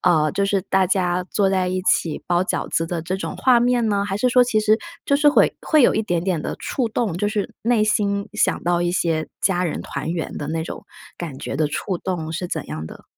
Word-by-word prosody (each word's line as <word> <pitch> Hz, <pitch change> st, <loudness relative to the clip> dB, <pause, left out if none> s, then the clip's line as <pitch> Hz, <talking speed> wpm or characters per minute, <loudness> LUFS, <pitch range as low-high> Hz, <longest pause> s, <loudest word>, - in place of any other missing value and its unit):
呃， 155 Hz, -4 st, +3 dB
就 200 Hz, 0 st, +1 dB
是 195 Hz, -2 st, +1 dB
大 190 Hz, -1 st, +3 dB
家 180 Hz, -1 st, +1 dB
坐 195 Hz, -2 st, +2 dB
在 185 Hz, -1 st, +1 dB
一 185 Hz, 0 st, -2 dB
起 165 Hz, -4 st, +1 dB
包 175 Hz, 0 st, +2 dB
饺 -, -, -2 dB
子 165 Hz, -, 0 dB
的 165 Hz, -1 st, -3 dB
这 180 Hz, +3 st, -3 dB
种 190 Hz, -, -4 dB
画 250 Hz, -2 st, +4 dB
面 245 Hz, -1 st, +2 dB
呢？ 200 Hz, 0 st, 0 dB
还 195 Hz, -, -2 dB
是 250 Hz, +4 st, +1 dB
说 250 Hz, 0 st, +6 dB
其 230 Hz, -3 st, +1 dB
实 215 Hz, +1 st, +3 dB, 0.3 s
就 280 Hz, -, +2 dB
是 295 Hz, +1 st, +5 dB
会 290 Hz, -, +4 dB
会 310 Hz, -4 st, +3 dB
有 -, -, +5 dB
一 -, -, +2 dB
点 175 Hz, -4 st, -1 dB
点 180 Hz, -5 st, 0 dB
的 -, -, -4 dB
触 250 Hz, -4 st, -2 dB
动， 220 Hz, -5 st, -1 dB
就 205 Hz, -, +1 dB
是 210 Hz, -2 st, -2 dB
内 230 Hz, -2 st, +2 dB
心 200 Hz, -1 st, 0 dB
想 215 Hz, -, 0 dB
到 175 Hz, 0 st, +2 dB
一 175 Hz, 0 st, +1 dB
些 165 Hz, -3 st, 0 dB
家 180 Hz, -2 st, +2 dB
人 160 Hz, -, -3 dB
团 -, -, -4 dB
圆 165 Hz, -2 st, -3 dB
的 145 Hz, -, -5 dB
那 160 Hz, 0 st, -2 dB
种， -, -, -8 dB, 0.3 s
感 155 Hz, -6 st, -6 dB
觉 -, -, -4 dB
的 155 Hz, -, +2 dB
触 175 Hz, +4 st, -3 dB
动 165 Hz, -4 st, -3 dB
是 175 Hz, +2 st, -4 dB
怎 -, -, -4 dB
样 80 Hz, +1 st, -5 dB
的？ -, -, -12 dB
185 Hz, 265 characters per minute, -22 LUFS, 170-215 Hz, 0.3 s, 说